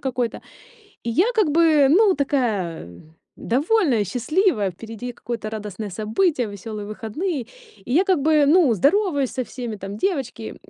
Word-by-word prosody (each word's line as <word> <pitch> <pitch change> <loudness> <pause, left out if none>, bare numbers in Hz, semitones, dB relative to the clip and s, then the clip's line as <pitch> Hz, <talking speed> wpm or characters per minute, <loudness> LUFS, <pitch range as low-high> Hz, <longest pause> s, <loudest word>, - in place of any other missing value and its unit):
какой-то. 250 -3 -2 0.7
И 235 - -3
я 335 - +3
как 425 -7 +3
бы, 310 -3 +4
ну, 395 +4 +5
такая 220 - -1 0.5
довольная, 275 - +1
счастливая, 250 - +1
впереди 225 +6 -8
какое-то 230 -2 -6
радостное 210 -1 -6
событие, 225 - 0
весёлые 205 +1 -7
выходные, 260 - -3 0.5
и 245 - -6
я 350 +7 +5
как 375 -6 +2
бы, 300 0 +3
ну, 310 -6 +5
здороваюсь 285 - +1
со 255 - -3
всеми, 240 -4 -6
там 195 +1 -7
девочки, 260 - -3
250 Hz, 140 wpm, -22 LUFS, 215-315 Hz, 0.7 s, ну